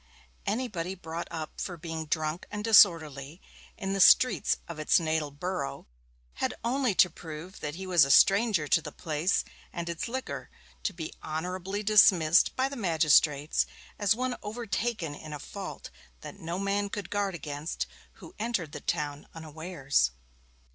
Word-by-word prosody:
Anybody 195 Hz, -5 st, -2 dB
brought 170 Hz, -2 st, -6 dB
up 155 Hz, -1 st, -6 dB
for 175 Hz, -, -4 dB
being 160 Hz, -1 st, -5 dB
drunk 155 Hz, +2 st, -2 dB
and 210 Hz, 0 st, -5 dB
disorderly 165 Hz, -8 st, +4 dB, 0.4 s
in 195 Hz, -2 st, -3 dB
the 195 Hz, -, -1 dB
streets 255 Hz, +7 st, +5 dB
of 170 Hz, -2 st, -7 dB
its 155 Hz, +5 st, +4 dB
natal 160 Hz, -2 st, -1 dB
borough, 145 Hz, -2 st, -4 dB, 0.6 s
had -, -, 0 dB
only 250 Hz, -2 st, +1 dB
to 180 Hz, -, +6 dB
prove 165 Hz, +2 st, -9 dB
that 150 Hz, 0 st, -5 dB
he 190 Hz, +2 st, -6 dB
was 175 Hz, -4 st, +5 dB
a 140 Hz, -, 0 dB
stranger 195 Hz, -, +5 dB
to 165 Hz, -, +3 dB
the -, -, -7 dB
place 160 Hz, +3 st, -1 dB, 0.3 s
and 170 Hz, -1 st, -5 dB
its 170 Hz, -1 st, -3 dB
liquor 260 Hz, +2 st, -5 dB, 0.3 s
to -, -, -1 dB
be 165 Hz, -4 st, -7 dB
honourably 180 Hz, +6 st, -3 dB
dismissed 190 Hz, -5 st, +5 dB
by 260 Hz, +1 st, +1 dB
the 280 Hz, -, -7 dB
magistrates, 155 Hz, -, +3 dB, 0.3 s
as 205 Hz, 0 st, +3 dB
one 255 Hz, +1 st, -2 dB
overtaken 215 Hz, -5 st, -3 dB
in 155 Hz, +1 st, -9 dB
a 150 Hz, -, -5 dB
fault 195 Hz, +6 st, -8 dB, 0.3 s
that -, -, -10 dB
no 170 Hz, +2 st, -4 dB
man 200 Hz, +1 st, -1 dB
could 200 Hz, -2 st, -6 dB
guard 200 Hz, -2 st, -1 dB
against 150 Hz, +1 st, -4 dB, 0.3 s
who -, -, -13 dB
entered 210 Hz, -9 st, -2 dB
the 150 Hz, -, -7 dB
town 150 Hz, -3 st, -3 dB
unawares. 160 Hz, -, -1 dB
170 Hz, 155 wpm, -29 LUFS, 155-200 Hz, 0.6 s, to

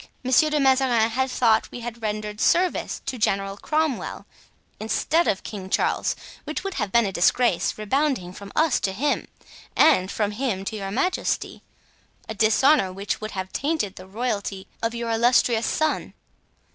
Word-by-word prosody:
Monsieur 260 Hz, +5 st, +4 dB
de 300 Hz, 0 st, +1 dB
Mazarin 260 Hz, -4 st, +3 dB
had 260 Hz, +3 st, 0 dB
thought 225 Hz, -3 st, +3 dB
that -, -, -17 dB
we 245 Hz, -, -7 dB
had 235 Hz, 0 st, -7 dB
rendered 210 Hz, -1 st, -3 dB
service 360 Hz, +1 st, +1 dB
to 255 Hz, -, -4 dB
General 195 Hz, -1 st, 0 dB
Cromwell, 305 Hz, +4 st, -2 dB, 0.5 s
instead 315 Hz, +9 st, +1 dB
of 190 Hz, -, 0 dB
King 190 Hz, -3 st, -7 dB
Charles, -, -, +1 dB, 0.3 s
which 305 Hz, +3 st, -4 dB
would 390 Hz, -1 st, -3 dB
have 210 Hz, -, -2 dB
been 235 Hz, 0 st, +4 dB
a 195 Hz, -, -2 dB
disgrace, 190 Hz, +2 st, +2 dB
rebounding 215 Hz, -4 st, -1 dB
from 200 Hz, +1 st, -10 dB
us 315 Hz, -4 st, +3 dB
to 190 Hz, -, -1 dB
him, 285 Hz, +9 st, -1 dB, 0.5 s
and 230 Hz, -13 st, +5 dB
from 210 Hz, 0 st, -1 dB
him 210 Hz, -4 st, -2 dB
to 220 Hz, -, -4 dB
your 195 Hz, -2 st, -4 dB
majesty—a 265 Hz, -, -4 dB
dishonor 220 Hz, +1 st, +3 dB
which 200 Hz, +3 st, -4 dB
would 215 Hz, 0 st, -5 dB
have 185 Hz, 0 st, -5 dB
tainted 280 Hz, -, -1 dB
the 185 Hz, -, -11 dB
royalty 200 Hz, -3 st, -3 dB, 0.2 s
of 230 Hz, +1 st, -1 dB
your 235 Hz, -1 st, -3 dB
illustrious 235 Hz, 0 st, +3 dB
son. 310 Hz, 0 st, -1 dB
225 Hz, 160 wpm, -24 LUFS, 200-270 Hz, 0.5 s, and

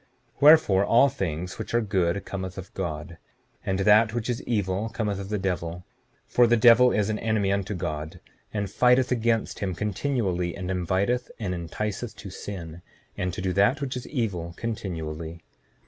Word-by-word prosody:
7:12 -, -, -27 dB
Wherefore, 145 Hz, -11 st, +7 dB
all 120 Hz, +6 st, +5 dB
things 90 Hz, -, -4 dB
which -, -, -4 dB
are -, -, +5 dB
good 100 Hz, -3 st, 0 dB
cometh 95 Hz, -1 st, -5 dB
of 95 Hz, 0 st, -9 dB
God; 80 Hz, -2 st, -5 dB, 0.4 s
and 95 Hz, -, -1 dB
that 105 Hz, +2 st, +5 dB
which 120 Hz, +1 st, -1 dB
is 120 Hz, -, -3 dB
evil 105 Hz, -1 st, -1 dB
cometh 105 Hz, -4 st, -2 dB
of 100 Hz, 0 st, -6 dB
the 105 Hz, -, -1 dB
devil; 90 Hz, -2 st, -3 dB, 0.4 s
for 120 Hz, -1 st, +4 dB
the 120 Hz, +1 st, +4 dB
devil 120 Hz, +2 st, +7 dB
is 105 Hz, 0 st, +1 dB
an 105 Hz, -, -2 dB
enemy 110 Hz, -3 st, +1 dB
unto 100 Hz, +1 st, -1 dB
God, 80 Hz, -3 st, -4 dB, 0.3 s
and 105 Hz, -1 st, -2 dB
fighteth 125 Hz, +5 st, +3 dB
against 115 Hz, -2 st, 0 dB
him 95 Hz, -3 st, -2 dB
continually, 100 Hz, -, -1 dB
and 95 Hz, -1 st, -4 dB
inviteth 95 Hz, +7 st, 0 dB
and 100 Hz, -5 st, -3 dB
enticeth 105 Hz, +7 st, -4 dB
to 100 Hz, -, -9 dB
sin, 90 Hz, -4 st, -7 dB, 0.3 s
and 90 Hz, 0 st, -2 dB
to 90 Hz, -, -5 dB
do 95 Hz, -1 st, 0 dB
that 100 Hz, -, +3 dB
which 135 Hz, -2 st, -3 dB
is 125 Hz, -, -6 dB
evil 90 Hz, -, -3 dB
continually. 85 Hz, -7 st, -5 dB
100 Hz, 175 wpm, -26 LUFS, 90-115 Hz, 0.4 s, Wherefore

